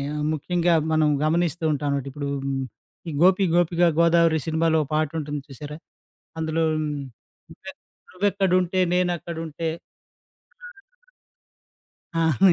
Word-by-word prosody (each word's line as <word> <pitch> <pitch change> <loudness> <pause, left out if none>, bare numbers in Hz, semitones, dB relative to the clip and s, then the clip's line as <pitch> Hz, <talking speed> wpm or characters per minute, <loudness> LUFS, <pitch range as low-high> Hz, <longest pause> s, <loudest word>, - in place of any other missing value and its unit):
ఆహ్, 150 - -2
ముఖ్యంగా 175 +3 +1 0.2
మనం 155 -1 +3 0.2
గమనిస్తూ 165 +1 0
ఉంటాం 145 0 -2
అన్నమాట. 140 -1 -1
ఇప్పుడు, 145 0 -4 0.2
హ్మ్. 135 -1 -1 0.5
ఈ - - -4
'గోపి 185 +2 +5
గోపికా 175 0 +3
గోదావరి' 170 -2 +4
సినిమాలో 160 0 +2
ఓ - - -16
పాటుంటుంది 150 -1 -2
చూసారా? 150 +2 -8 0.6
అందులో 160 0 0 0.2
'నువ్వు 140 -5 -10
ఎక్ - - -29 0.3
నువ్వు 190 +3 +1
ఎక్కడుంటే, 185 -1 +1
నేను 180 0 +2
అక్కడుంటే 165 -1 -5 2.5
ప్రాణం' 165 +3 +4
160 Hz, 115 wpm, -24 LUFS, 150-175 Hz, 2.5 s, గోపి